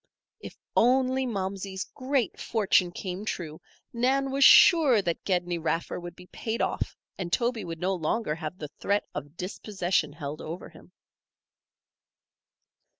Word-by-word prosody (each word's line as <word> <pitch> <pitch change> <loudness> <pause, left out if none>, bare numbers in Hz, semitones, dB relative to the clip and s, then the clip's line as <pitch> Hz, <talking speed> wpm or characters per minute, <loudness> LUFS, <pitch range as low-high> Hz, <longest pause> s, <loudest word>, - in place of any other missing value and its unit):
If - - -10 0.2
only 260 +2 +3
Momsey's 190 -2 -3
great 260 -4 -2
fortune 195 -5 +2
came 185 +2 -5
true, 160 -7 -5 0.3
Nan 265 +3 +1
was 275 +1 +2
sure 290 -6 +8
that 175 -4 -2
Gedney 175 -2 0
Raffer 165 +2 -2
would 175 -1 -8
be 180 - -13
paid 220 +5 -4
off - - -2 0.2
and 175 -2 -4
Toby 235 0 0
would 165 -1 -6
no 185 +2 0
longer 175 +1 -1
have 160 +2 -6
the 150 -4 -7
threat 200 +1 0
of 145 +2 -7
dispossession 180 -4 -1
held 150 -1 -6
over 165 +3 -7
him. - - -17
190 Hz, 140 wpm, -27 LUFS, 170-235 Hz, 0.3 s, sure